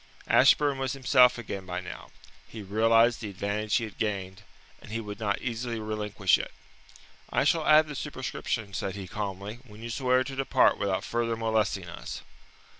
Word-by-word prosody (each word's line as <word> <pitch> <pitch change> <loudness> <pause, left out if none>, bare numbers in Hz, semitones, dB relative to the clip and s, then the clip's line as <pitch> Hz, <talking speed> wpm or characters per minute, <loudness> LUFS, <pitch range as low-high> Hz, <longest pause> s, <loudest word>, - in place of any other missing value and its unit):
Ashburn 145 -2 +4
was 130 -1 -1
himself 125 -2 +5
again 100 -5 -6
by 90 0 -3
now. 90 - -9 0.4
He 105 +10 -8
realized 115 +4 +3
the 110 - -4
advantage 100 +2 -2
he 120 - +2
had 110 -3 -8
gained, 100 -2 -3 0.4
and - - -13
he 115 - -2
would 105 -1 -7
not 100 -2 -1
easily 120 -1 -3
relinquish 105 -3 +1
it. - - -5 0.8
"I - - +2
shall 155 +2 +2
add 155 0 +6
the 150 - -6
superscription," 130 -6 -4
said 100 -1 -3
he 95 -2 -7
calmly, 100 +2 -5
"when 110 -3 -13
you 115 - -5
swear 130 0 +2
to 135 +1 -7
depart 135 -1 +3
without 100 -2 -1
further 115 -1 -1
molesting 110 -5 0
us." 65 -6 -7
110 Hz, 175 wpm, -28 LUFS, 100-125 Hz, 0.8 s, add